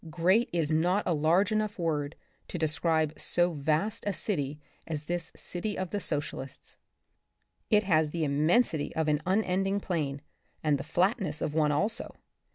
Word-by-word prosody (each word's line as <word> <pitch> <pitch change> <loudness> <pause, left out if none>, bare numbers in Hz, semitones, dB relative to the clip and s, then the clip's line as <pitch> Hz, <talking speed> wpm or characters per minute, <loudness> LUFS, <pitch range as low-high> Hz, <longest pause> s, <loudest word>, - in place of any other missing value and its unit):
Great 185 +9 +3
is 165 -3 0
not 175 +6 +2
a 175 - +2
large 165 +7 +3
enough 215 -1 0
word 150 -4 -1 0.3
to - - -5
describe 160 -1 +1
so 175 0 +2
vast 155 +9 0
a 205 - +1
city 150 -8 -2 0.3
as 155 -2 -3
this 175 +1 -3
city 205 +4 -4
of 185 -2 -3
the 205 - -1
Socialists— 145 -5 -4 0.9
it 210 -1 +4
has 160 -5 +3
the 165 +1 -2
immensity 155 - +2
of 160 -1 0
an 150 0 +2
unending 195 0 +1
plain, 150 -8 -2 0.4
and 150 -3 +2
the - - -4
flatness 175 - 0
of 150 - -2
one 150 -1 +3
also. 205 +10 -1
165 Hz, 160 wpm, -29 LUFS, 150-195 Hz, 0.9 s, it